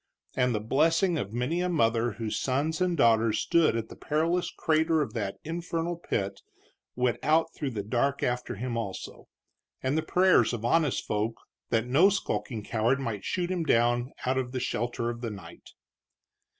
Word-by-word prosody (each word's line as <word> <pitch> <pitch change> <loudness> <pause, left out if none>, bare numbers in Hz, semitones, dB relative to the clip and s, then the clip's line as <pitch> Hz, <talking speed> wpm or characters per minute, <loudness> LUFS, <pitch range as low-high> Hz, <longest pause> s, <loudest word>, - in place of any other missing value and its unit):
And 125 -2 +2
the - - 0
blessing 165 - +2
of 100 -5 -4
many 125 +9 -1
a 180 - 0
mother 115 -7 +2
whose 110 -1 -3
sons 145 +6 -1
and 180 -2 +1
daughters 115 -3 +4
stood 170 -6 +3
at 115 -1 -3
the - - -10
perilous 165 +4 0
crater 160 0 +1
of 150 - -2
that 105 -5 -3
infernal 170 +1 -3
pit 100 -12 -3 0.5
went 125 -1 0
out 160 +2 +2
through 145 - -3
the 105 -5 -4
dark 125 +6 0
after 125 0 -1
him, 120 +3 -4
also; 105 -5 -6 0.6
and 130 +2 +1
the 160 - +2
prayers 180 -11 +3
of 115 -1 -4
honest 150 +2 +2
folk 110 +2 -1 0.3
that 115 -1 +1
no 145 +10 +5
skulking 130 - -2
coward 115 +5 +1
might 115 -7 -4
shoot 180 -1 -2
him 180 -2 -1
down 120 -1 +2
out 130 +1 +1
of 125 -1 -4
the 130 - -1
shelter 120 -1 -2
of 120 0 -8
the 120 - -3
night. 95 -6 -11
125 Hz, 175 wpm, -28 LUFS, 115-160 Hz, 0.6 s, no